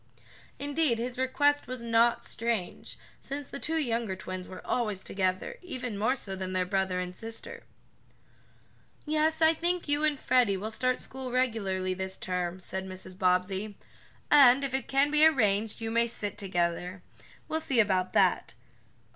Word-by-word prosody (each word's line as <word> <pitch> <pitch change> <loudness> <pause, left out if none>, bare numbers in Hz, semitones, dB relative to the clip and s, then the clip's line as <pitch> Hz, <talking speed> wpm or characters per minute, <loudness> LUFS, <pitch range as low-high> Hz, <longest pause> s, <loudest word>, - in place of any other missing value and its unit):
Indeed 285 -3 +1
his 245 +2 -4
request 290 +2 +2
was 255 -1 -6
not 230 0 +3
strange, 230 -6 -3 0.2
since 280 0 -6
the - - -6
two 320 +3 -1
younger 235 -8 -1
twins 185 -1 -6
were 185 - -10
always 210 -6 -1
together 190 - -2
even 255 - -5
more 220 +6 +1
so 195 -7 -3
than 185 0 -4
their 185 -1 +1
brother 190 0 0
and 180 0 -4
sister. 230 - -7 1.4
"Yes, 310 +1 +1
I 320 +1 +6
think 345 +2 -1
you 290 +1 +1
and 305 -2 +2
Freddie 245 -6 +3
will 215 +4 -4
start 255 +2 +1
school 260 -1 -7
regularly 200 -7 0
this 190 0 -4
term," 180 -1 -3
said 190 +1 -4
Mrs. 185 0 -7
Bobbsey, 190 +2 0 0.5
"and, 275 -2 +7
if 270 -1 -3
it 265 -2 -2
can 275 +2 +2
be 300 0 +4
arranged, 220 -8 +3
you 225 0 -3
may 235 +1 +2
sit 205 -3 -3
together. 180 -1 -2 0.4
We'll 320 - -1
see 275 -6 0
about 190 -4 +2
that. - - +2
230 Hz, 160 wpm, -29 LUFS, 190-275 Hz, 1.4 s, and